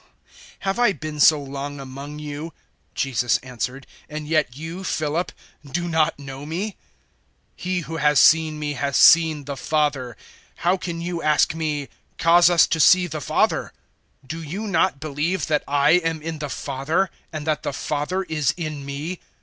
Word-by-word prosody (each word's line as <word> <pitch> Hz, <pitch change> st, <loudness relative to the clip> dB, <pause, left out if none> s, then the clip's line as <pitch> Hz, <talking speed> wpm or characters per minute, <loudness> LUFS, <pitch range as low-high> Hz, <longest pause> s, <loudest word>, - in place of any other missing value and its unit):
014:009 -, -, -24 dB, 0.2 s
"Have 195 Hz, +3 st, -1 dB
I 240 Hz, -4 st, +4 dB
been 155 Hz, -1 st, -7 dB
so 155 Hz, +1 st, +6 dB
long 140 Hz, +1 st, -6 dB
among 140 Hz, +2 st, -8 dB
you," 150 Hz, +2 st, -6 dB, 0.4 s
Jesus 120 Hz, -3 st, +1 dB
answered, 130 Hz, +1 st, -5 dB, 0.2 s
"and 150 Hz, 0 st, -6 dB
yet 150 Hz, -5 st, +1 dB
you, 165 Hz, +5 st, -6 dB
Philip, 160 Hz, 0 st, -1 dB, 0.3 s
do 170 Hz, +5 st, -3 dB
not 160 Hz, -1 st, +1 dB
know 135 Hz, -1 st, -8 dB
me? 185 Hz, +7 st, -4 dB, 0.8 s
He 180 Hz, 0 st, -2 dB
who 165 Hz, 0 st, -6 dB
has 150 Hz, -2 st, +4 dB
seen 155 Hz, -1 st, +5 dB
me 150 Hz, -1 st, -3 dB
has 140 Hz, +1 st, -1 dB
seen 160 Hz, -3 st, +6 dB
the 140 Hz, 0 st, -4 dB
Father. 140 Hz, -4 st, -1 dB, 0.4 s
How 175 Hz, +2 st, +1 dB
can 170 Hz, -2 st, -5 dB
*you* 170 Hz, 0 st, -3 dB
ask 150 Hz, 0 st, +3 dB
me, 150 Hz, -3 st, -2 dB, 0.3 s
`Cause 170 Hz, +1 st, +6 dB
us 175 Hz, -2 st, +6 dB
to 165 Hz, -, -1 dB
see 180 Hz, +3 st, +6 dB
the 155 Hz, -3 st, -5 dB
Father'? -, -, 0 dB, 0.5 s
014:010 -, -, -22 dB
Do 165 Hz, +1 st, -5 dB
you 180 Hz, +8 st, -5 dB
not 180 Hz, -6 st, +1 dB
believe 155 Hz, +3 st, -1 dB
that 150 Hz, 0 st, 0 dB
I 145 Hz, +1 st, +3 dB
am 165 Hz, -2 st, +2 dB
in 160 Hz, -1 st, -4 dB
the 150 Hz, -1 st, -4 dB
Father 145 Hz, +8 st, -1 dB, 0.2 s
and 155 Hz, -2 st, -5 dB
that 155 Hz, -2 st, 0 dB
the -, -, -3 dB
Father 150 Hz, +7 st, -2 dB
is 155 Hz, -6 st, 0 dB
in 155 Hz, -4 st, -4 dB
me? 145 Hz, +6 st, -5 dB
155 Hz, 175 wpm, -23 LUFS, 145-165 Hz, 0.8 s, so